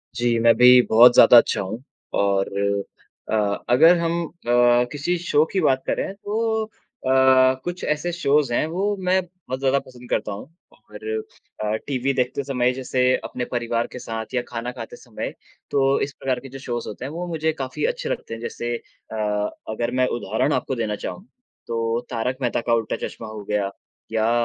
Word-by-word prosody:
जी, 120 Hz, -1 st, +1 dB
मैं 115 Hz, 0 st, +6 dB
भी 125 Hz, 0 st, +8 dB
बहुत 120 Hz, +2 st, +8 dB
ज़्यादा 120 Hz, -, +8 dB
अच्छा 115 Hz, -, +4 dB
हूँ 110 Hz, +6 st, -6 dB, 0.4 s
और 100 Hz, -1 st, +1 dB, 0.8 s
अ, -, -, -2 dB, 0.4 s
अगर 165 Hz, +8 st, +6 dB
हम 170 Hz, 0 st, 0 dB
अ, -, -, -9 dB, 0.6 s
किसी 150 Hz, +5 st, -1 dB
शो 160 Hz, -3 st, +2 dB
की 195 Hz, -, +1 dB
बात 135 Hz, -4 st, +2 dB
करें, 195 Hz, -, -1 dB
तो 220 Hz, +2 st, -1 dB
अ, -, -, -21 dB, 0.9 s
कुछ 175 Hz, +1 st, -5 dB
ऐसे 150 Hz, +3 st, -1 dB
शोज़ 150 Hz, -5 st, +1 dB
हैं -, -, +2 dB
वो 195 Hz, +5 st, -1 dB
मैं 185 Hz, +1 st, +3 dB
बहुत 170 Hz, -8 st, -8 dB
ज़्यादा 135 Hz, 0 st, +2 dB
पसंद 125 Hz, -1 st, -14 dB
करता -, -, -1 dB
हूँ 100 Hz, -, -6 dB, 0.3 s
और 105 Hz, 0 st, -12 dB, 0.6 s
अ, 105 Hz, 0 st, 0 dB
टीवी 135 Hz, -1 st, 0 dB
देखते 130 Hz, +2 st, -1 dB
समय 125 Hz, -2 st, +1 dB
जैसे 130 Hz, 0 st, -1 dB, 0.2 s
अपने 125 Hz, -, -4 dB
परिवार 120 Hz, -1 st, -1 dB
के 125 Hz, -, -7 dB
साथ 115 Hz, 0 st, -6 dB
या 125 Hz, -, +1 dB
खाना 120 Hz, +1 st, -4 dB
खाते 120 Hz, -3 st, -8 dB
समय -, -, -6 dB, 0.4 s
तो 135 Hz, 0 st, +3 dB
इस 140 Hz, -, -2 dB
प्रकार 130 Hz, -2 st, -1 dB
के 135 Hz, +2 st, -11 dB
जो 135 Hz, +1 st, -9 dB
शोज़ 120 Hz, -2 st, -4 dB
होते 105 Hz, -, -6 dB
हैं, 140 Hz, -, -5 dB
वो 170 Hz, +3 st, -4 dB
मुझे 160 Hz, -2 st, -1 dB
काफ़ी 135 Hz, -, -3 dB
अच्छे -, -, -2 dB
लगते -, -, -4 dB
हैं। 115 Hz, -, -7 dB
जैसे 120 Hz, 0 st, -3 dB, 0.4 s
अ, -, -, -5 dB, 0.5 s
अगर 120 Hz, +2 st, -2 dB
मैं 130 Hz, 0 st, +2 dB
उदाहरण 110 Hz, +9 st, 0 dB
आपको 130 Hz, -, -1 dB
देना 110 Hz, -3 st, -2 dB
चाहूँ, 180 Hz, -, -7 dB, 0.4 s
तो 115 Hz, 0 st, -1 dB
तारक 125 Hz, +1 st, -2 dB
मेहता 120 Hz, -1 st, 0 dB
का 115 Hz, -, 0 dB
उल्टा 115 Hz, -2 st, 0 dB
चश्मा 115 Hz, -, -9 dB
हो 110 Hz, -1 st, -8 dB
गया 100 Hz, -1 st, -1 dB, 0.4 s
या 110 Hz, 0 st, +1 dB
125 Hz, 185 wpm, -23 LUFS, 115-150 Hz, 0.9 s, भी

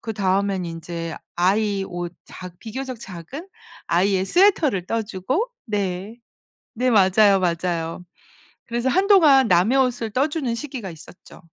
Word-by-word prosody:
그다음엔 200 Hz, -3 st, -1 dB
인제 165 Hz, 0 st, -6 dB, 0.2 s
아이 200 Hz, +3 st, +1 dB
옷 175 Hz, -1 st, -5 dB
작 180 Hz, -1 st, -11 dB
비교적 255 Hz, +1 st, -6 dB
작은 215 Hz, -, -9 dB, 0.4 s
아이의 185 Hz, +2 st, +2 dB
스웨터를 310 Hz, -, +3 dB
떠주고 230 Hz, -, -2 dB, 0.2 s
네. 200 Hz, -1 st, -3 dB, 0.6 s
네 255 Hz, +1 st, 0 dB
맞아요, 200 Hz, -2 st, +5 dB
맞아요. 170 Hz, -1 st, -2 dB, 0.6 s
그래서 240 Hz, +2 st, -1 dB
한동안 325 Hz, -, +5 dB
남의 190 Hz, +9 st, +3 dB
옷을 245 Hz, -3 st, 0 dB
떠주는 270 Hz, +1 st, -1 dB
시기가 240 Hz, -6 st, -6 dB
있었죠. 165 Hz, +2 st, -14 dB
205 Hz, 270 characters per minute, -22 LUFS, 180-255 Hz, 0.6 s, 맞아요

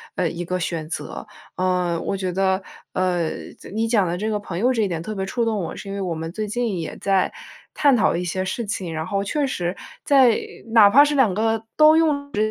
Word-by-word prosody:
呃， 175 Hz, -, 0 dB
一 170 Hz, +2 st, -5 dB
个 180 Hz, +1 st, -2 dB
选 160 Hz, -2 st, -3 dB
择。 -, -, -6 dB, 0.3 s
嗯， 180 Hz, -2 st, 0 dB
我 195 Hz, -, -2 dB
觉 185 Hz, -2 st, -3 dB
得， 190 Hz, +1 st, +1 dB, 0.3 s
呃， 180 Hz, -3 st, 0 dB, 0.3 s
这 -, -, -12 dB
你 225 Hz, +3 st, -1 dB
讲 215 Hz, -4 st, +3 dB
的 175 Hz, 0 st, -2 dB
这 215 Hz, +4 st, -2 dB
个 210 Hz, -, 0 dB
朋 185 Hz, -4 st, -6 dB
友 250 Hz, +5 st, +3 dB
这 230 Hz, -, 0 dB
一 205 Hz, -, +1 dB
点 165 Hz, -2 st, -3 dB
特 215 Hz, +6 st, -5 dB
别 190 Hz, -1 st, -2 dB
触 235 Hz, +4 st, -1 dB
动 225 Hz, -1 st, 0 dB
我， 165 Hz, -, -5 dB
是 -, -, -9 dB
因 195 Hz, -, -4 dB
为 200 Hz, -, -3 dB
我 180 Hz, -3 st, -2 dB
们 165 Hz, +1 st, -5 dB
最 215 Hz, +1 st, -3 dB
近 235 Hz, -4 st, -1 dB
也 160 Hz, -, -6 dB
在 195 Hz, -2 st, +1 dB, 0.4 s
探 285 Hz, -3 st, +4 dB
讨 235 Hz, -, +3 dB
一 180 Hz, -, -3 dB
些 185 Hz, +2 st, -2 dB
事 205 Hz, +5 st, -3 dB
情。 190 Hz, -5 st, -4 dB
然 160 Hz, +1 st, -4 dB
后 200 Hz, +1 st, -1 dB
确 280 Hz, +8 st, -1 dB
实， 175 Hz, -9 st, -2 dB, 0.3 s
在 260 Hz, -5 st, +5 dB, 0.4 s
哪 215 Hz, -3 st, +8 dB
怕 280 Hz, +7 st, +7 dB
是 295 Hz, 0 st, 0 dB
2 250 Hz, -9 st, +4 dB
个 225 Hz, +2 st, 0 dB
都 310 Hz, 0 st, +7 dB
用 295 Hz, -3 st, +1 dB
直 215 Hz, +1 st, +1 dB
195 Hz, 255 characters per minute, -22 LUFS, 180-230 Hz, 0.4 s, 哪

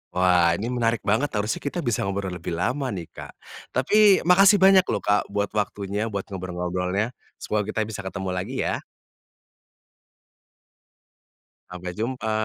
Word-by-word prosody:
Wah, 90 Hz, -2 st, +4 dB
ini 110 Hz, +6 st, -3 dB
menarik 115 Hz, -2 st, 0 dB
banget, 110 Hz, +8 st, +1 dB
harusnya 105 Hz, +1 st, -1 dB
kita 145 Hz, +5 st, -4 dB
bisa 120 Hz, -6 st, 0 dB
ngobrol 95 Hz, -1 st, -3 dB
lebih 85 Hz, -1 st, -5 dB
lama 130 Hz, +10 st, -1 dB
nih, 85 Hz, -3 st, -7 dB
Kak. -, -, -10 dB, 0.4 s
Tapi 200 Hz, +9 st, +5 dB
makasih 195 Hz, +4 st, +6 dB
banyak 190 Hz, -1 st, +6 dB
lho, 105 Hz, -, 0 dB
Kak, 105 Hz, 0 st, +1 dB
buat 100 Hz, 0 st, -2 dB
waktunya, 105 Hz, 0 st, -2 dB
buat 100 Hz, -3 st, -3 dB
ngobrol-ngobrolnya, 90 Hz, +3 st, -2 dB, 0.2 s
semoga 105 Hz, -1 st, -2 dB
kita 110 Hz, 0 st, -1 dB
bisa 110 Hz, -1 st, -7 dB
ketemu 95 Hz, -1 st, -4 dB
lagi 95 Hz, +8 st, -4 dB
ya. -, -, -1 dB, 2.9 s
Sampai 90 Hz, 0 st, -6 dB
jumpa. 110 Hz, +3 st, -3 dB
105 Hz, 140 wpm, -24 LUFS, 95-125 Hz, 2.9 s, makasih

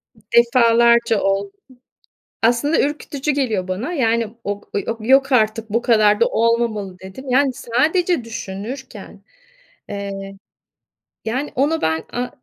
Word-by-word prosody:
I -, -, -23 dB, 0.2 s
defalarca 235 Hz, -2 st, +4 dB
oldu. 195 Hz, 0 st, 0 dB, 0.9 s
Aslında 240 Hz, +7 st, +2 dB
ürkütücü 295 Hz, 0 st, -2 dB
geliyor 230 Hz, -10 st, -1 dB
bana. 210 Hz, -, -3 dB
Yani 230 Hz, -6 st, +1 dB, 0.2 s
ok 205 Hz, 0 st, -5 dB
ııı, 200 Hz, -, 0 dB
o 230 Hz, -, -2 dB
"Yok 270 Hz, +2 st, +4 dB
artık, 220 Hz, -2 st, +1 dB
bu 230 Hz, +3 st, 0 dB
kadar 215 Hz, -4 st, +3 dB
da 235 Hz, -, +5 dB
olmamalı!" 225 Hz, -5 st, 0 dB
dedim. 190 Hz, +8 st, -10 dB
Yani, 265 Hz, +1 st, +3 dB
sadece 310 Hz, +7 st, 0 dB
düşünürken, 230 Hz, +4 st, -8 dB, 0.7 s
eee, 200 Hz, -1 st, -5 dB, 0.9 s
yani, 255 Hz, +6 st, -3 dB
ona 300 Hz, +5 st, +1 dB
ben 160 Hz, 0 st, 0 dB
a 245 Hz, +1 st, -2 dB
230 Hz, 125 wpm, -20 LUFS, 205-265 Hz, 0.9 s, da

